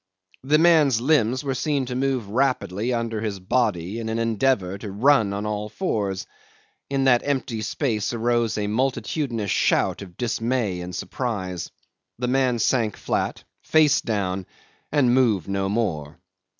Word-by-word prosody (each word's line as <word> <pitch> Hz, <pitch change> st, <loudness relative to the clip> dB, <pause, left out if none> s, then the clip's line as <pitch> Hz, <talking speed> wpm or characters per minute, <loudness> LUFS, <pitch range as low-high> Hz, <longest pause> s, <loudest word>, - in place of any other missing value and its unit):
The 145 Hz, +3 st, +4 dB
man's 155 Hz, -7 st, +5 dB
limbs 130 Hz, -1 st, +2 dB
were 135 Hz, -2 st, -1 dB
seen 140 Hz, 0 st, 0 dB
to 125 Hz, -, -5 dB
move 130 Hz, -4 st, 0 dB
rapidly 120 Hz, -2 st, 0 dB
under 115 Hz, -2 st, -2 dB
his 105 Hz, -3 st, -3 dB
body 100 Hz, -1 st, 0 dB
in 110 Hz, -1 st, -4 dB
an 110 Hz, -, -1 dB
endeavour 115 Hz, -4 st, +1 dB
to 105 Hz, -1 st, -6 dB
run 115 Hz, 0 st, +3 dB
on 100 Hz, +1 st, -3 dB
all 105 Hz, 0 st, -3 dB
fours. 105 Hz, -, -2 dB, 0.6 s
In 135 Hz, -1 st, 0 dB
that 125 Hz, -3 st, +4 dB
empty 130 Hz, -5 st, -2 dB
space 110 Hz, -1 st, -1 dB
arose 120 Hz, -1 st, 0 dB
a 105 Hz, -, -1 dB
multitudinous 120 Hz, -, -1 dB
shout -, -, +2 dB
of 90 Hz, -3 st, -11 dB
dismay 115 Hz, -5 st, -1 dB
and 90 Hz, +1 st, -6 dB
surprise. 95 Hz, -8 st, -4 dB, 0.5 s
The 125 Hz, +1 st, -2 dB
man 130 Hz, -1 st, +2 dB
sank 115 Hz, -2 st, +1 dB
flat, -, -, -2 dB, 0.2 s
face 155 Hz, -2 st, +4 dB
down, 95 Hz, -4 st, -2 dB, 0.4 s
and 135 Hz, -5 st, +3 dB
moved 115 Hz, -9 st, +2 dB
no 95 Hz, 0 st, -1 dB
more. 85 Hz, -9 st, -2 dB
115 Hz, 150 wpm, -24 LUFS, 100-130 Hz, 0.6 s, man's